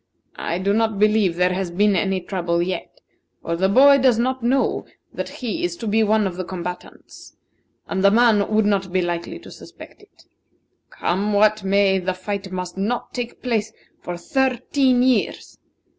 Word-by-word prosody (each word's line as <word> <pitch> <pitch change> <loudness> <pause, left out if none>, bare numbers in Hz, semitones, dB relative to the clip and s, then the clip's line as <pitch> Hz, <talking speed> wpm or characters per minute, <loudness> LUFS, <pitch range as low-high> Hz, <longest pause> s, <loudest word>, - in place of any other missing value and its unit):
I 170 - -2
do 195 +2 0
not 220 -1 +1
believe 210 -4 +2
there 180 +1 +2
has 185 -1 -2
been 200 +3 +2
any 190 +1 0
trouble 175 -2 -2
yet, 175 0 -4 0.4
for 170 - -2
the 190 +3 +1
boy 275 +6 +6
does 255 -3 +3
not 260 +2 -1
know 255 +3 0 0.3
that - - -5
he 255 +7 -5
is 350 0 -2
to 230 - -7
be 220 +1 +2
one 215 0 +2
of 185 -2 -4
the 185 - -3
combatants, 180 0 -9 0.5
and 190 0 -2
the 200 - +7
man 220 -2 +3
would 215 0 +3
not 195 -3 0
be 185 0 +1
likely 175 -1 -4
to - - -13
suspect - - -13
it. - - -22 0.7
Come 200 +4 -1
what 215 0 +3
may, 195 0 +2
the 185 0 -2
fight 195 +1 -5
must 180 0 -5
not 230 +5 -2
take 245 -1 -6
place 225 -4 -1 0.3
for 175 0 -6
thirteen 255 +4 +1
years. 255 -4 -1
200 Hz, 175 wpm, -21 LUFS, 185-230 Hz, 0.7 s, the